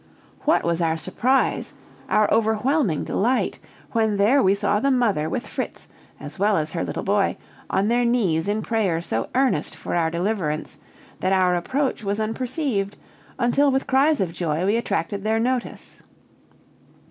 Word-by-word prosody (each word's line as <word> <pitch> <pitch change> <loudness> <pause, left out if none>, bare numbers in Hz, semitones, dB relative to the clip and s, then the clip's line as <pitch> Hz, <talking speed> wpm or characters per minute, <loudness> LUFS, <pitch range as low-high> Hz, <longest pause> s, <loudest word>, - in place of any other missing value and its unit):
What 310 - +3
was 170 0 0
our 165 -1 +1
surprise 250 +10 0 0.3
our 215 -1 +3
overwhelming 220 - +1
delight 245 +5 0 0.3
when 220 -2 +1
there 230 +8 +4
we 195 -2 +4
saw 205 0 +1
the 275 - +1
mother 220 - +1
with - - -3
Fritz, - - -5 0.3
as 150 +3 -9
well 205 +1 +3
as 155 0 -1
her 165 - -2
little - - -4
boy, 200 0 +1 0.3
on 195 - +1
their 240 +2 +2
knees 200 -9 +1
in 210 +1 -1
prayer 205 -8 0
so 115 -10 -3
earnest 245 - +1
for - - -6
our 165 -2 +2
deliverance, 170 -3 -2 0.4
that 185 +1 +1
our 185 -1 +3
approach 260 +8 -1
was 200 +1 -1
unperceived, 225 -2 -2 0.4
until 260 +4 +3
with 270 0 0
cries 280 +3 +3
of 180 -4 -1
joy 165 0 -1
we 205 +3 +2
attracted 200 -3 -2
their 220 +1 +1
notice. 250 +1 -3
210 Hz, 160 wpm, -23 LUFS, 175-245 Hz, 0.4 s, there